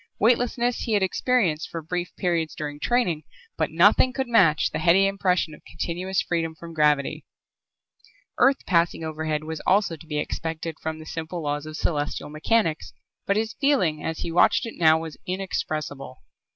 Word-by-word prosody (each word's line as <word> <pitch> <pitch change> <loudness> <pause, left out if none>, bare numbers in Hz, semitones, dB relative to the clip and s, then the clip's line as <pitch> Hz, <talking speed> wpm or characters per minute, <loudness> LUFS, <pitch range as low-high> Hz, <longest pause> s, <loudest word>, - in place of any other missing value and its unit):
Weightlessness 240 +1 +2
he 225 - -2
had 205 -2 +3
experienced 190 -5 +1
for 165 -1 -6
brief 175 +2 -3
periods 170 -3 -1
during 145 -1 -5
training, 180 -8 +1 0.3
but 160 - 0
nothing 205 +10 +4
could 265 -1 -2
match 185 -10 +4
the - - -3
heady 175 +5 +5
impression 185 -5 0
of - - -14
continuous 185 +3 -2
freedom 165 -2 -2
from 165 +1 -10
gravity. 150 -3 +1 1.2
Earth 270 0 +3
passing 170 -2 +1
overhead 155 -1 -2
was 160 0 -5
also 195 -3 +3
to 160 +1 -15
be 150 -1 -3
expected 160 +1 -4
from 160 0 -4
the 155 - -10
simple 165 +1 -5
laws 145 +1 -2
of 155 0 -7
celestial 150 -2 -2
mechanics 160 +1 0 0.3
but 200 - +2
his 220 0 -1
feeling 185 - +2
as 160 - -3
he 170 - -3
watched 175 - +4
it 230 - -6
now 160 -2 +5
was 160 -2 -7
inexpressible. 155 -7 -4
165 Hz, 165 wpm, -25 LUFS, 155-195 Hz, 1.2 s, heady